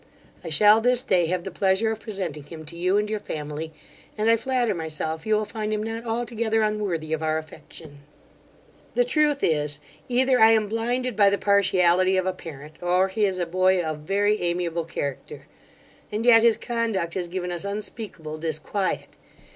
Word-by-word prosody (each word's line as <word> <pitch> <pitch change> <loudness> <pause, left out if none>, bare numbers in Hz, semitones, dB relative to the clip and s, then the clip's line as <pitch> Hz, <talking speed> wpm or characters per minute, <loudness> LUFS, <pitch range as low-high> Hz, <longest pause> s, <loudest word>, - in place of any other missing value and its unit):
I 170 - -5
shall 210 +7 +6
this 250 +1 +3
day 175 -3 +2
have 180 +1 -1
the 190 - -6
pleasure 195 +3 +2
of 220 - -4
presenting 190 -9 -5
him 155 +2 -10
to 165 +3 -9
you 185 +3 +1
and 210 0 +1
your 215 0 -2
family; 150 -1 -5 0.5
and 215 +2 +3
I - - +6
flatter 240 -1 0
myself 160 0 -3
you 215 - +3
will 215 0 0
find 215 0 -4
him 215 0 -1
not 225 +1 -5
altogether 225 -1 0
unworthy 195 -7 -1
of 160 - -1
our 155 0 0
affection. 155 -1 -9 1.0
'The - - +3
truth 300 - +1
is, 150 -2 +1 0.3
either 255 +1 +3
I 220 0 +7
am 215 -2 +2
blinded 240 +3 -1
by 200 -1 +5
the 200 - +1
partiality 185 -2 +3
of 185 - +1
a 185 - 0
parent, 150 -3 -10
or 180 +2 +2
he 210 +2 +1
is 190 -1 -3
a 175 - -1
boy 185 +2 +2
of 155 -3 -3
very 205 +6 +1
amiable 170 -1 -1
character; 140 -4 -5 0.7
and 215 +2 -2
yet 230 -2 +7
his 230 -1 +4
conduct 225 -8 -2
has 180 -2 -2
given 180 0 -4
us 175 0 -2
unspeakable 200 -6 -5
disquiet. 165 +5 -2
190 Hz, 185 wpm, -24 LUFS, 165-220 Hz, 1.0 s, I